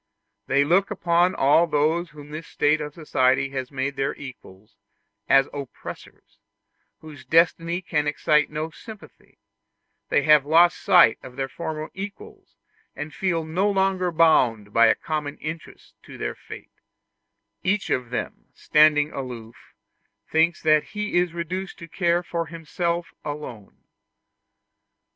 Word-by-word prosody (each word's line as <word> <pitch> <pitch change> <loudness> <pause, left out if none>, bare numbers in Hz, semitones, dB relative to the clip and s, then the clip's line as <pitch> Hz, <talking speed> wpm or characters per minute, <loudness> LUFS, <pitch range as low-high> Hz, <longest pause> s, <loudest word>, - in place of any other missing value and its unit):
They 140 +1 +3
look 180 +7 +2
upon 175 -2 +1
all 150 +5 +4
those 160 +3 0
whom 150 -1 -13
this 155 +2 -7
state 150 +1 +1
of 150 0 -6
society 135 -4 +1
has 130 -1 -5
made 140 +1 -3
their 135 0 -1
equals 110 -6 -12 0.5
as 135 0 +5
oppressors, 140 -3 -10 0.6
whose 150 -3 -12
destiny 165 +2 +2
can 150 -3 -1
excite 150 0 +2
no 155 +2 -4
sympathy; 215 +5 -14 0.7
they 145 - +2
have 150 -2 +6
lost 165 +4 +4
sight 170 -11 +5
of 125 - -12
their 135 0 -2
former 155 +2 -6
equals, 200 +1 -10 0.4
and 150 +1 -7
feel 170 -4 -1
no 180 +6 0
longer 190 -2 +1
bound 120 -11 +3
by 115 0 +6
a - - +4
common 150 -2 -4
interest 155 +1 -8
to - - -12
their - - -3
fate: - - -12 0.9
each 195 +2 -1
of 125 -2 -1
them, 125 - -5
standing 150 -1 +3
aloof, 120 -4 -9 0.5
thinks 160 +1 +1
that 155 -1 +4
he 210 0 -5
is 175 -1 0
reduced 175 +3 -5
to 170 - -10
care 175 0 0
for 170 -1 -3
himself 170 +2 -3
alone. 145 -9 -8
155 Hz, 135 wpm, -24 LUFS, 140-170 Hz, 0.9 s, have